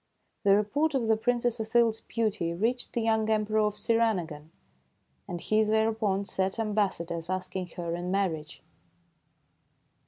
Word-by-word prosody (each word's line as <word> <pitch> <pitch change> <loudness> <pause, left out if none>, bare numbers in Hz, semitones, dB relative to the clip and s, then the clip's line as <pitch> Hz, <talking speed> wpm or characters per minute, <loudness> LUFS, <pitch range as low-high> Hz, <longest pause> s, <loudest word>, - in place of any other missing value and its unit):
The 200 -1 +6
report 280 +9 +1
of 250 -4 +1
the 220 0 +3
Princess 240 +1 0
Othilde 225 +1 +3
's 220 - -9
beauty 210 -7 -1
reached 235 +7 -1
the 235 - -1
young 220 -1 +1
Emperor 215 0 +1
of 210 -1 +1
Sirinagon, 185 -10 0 0.8
and 175 -3 -5
he 215 +5 +2
thereupon 220 -2 +1
sent 190 +1 0
am 220 -2 -1
bassadors 170 -5 -1
asking 185 0 -3
her 170 -1 -3
in 175 +1 -4
marriage. 175 -6 -2
215 Hz, 145 wpm, -28 LUFS, 185-225 Hz, 0.8 s, The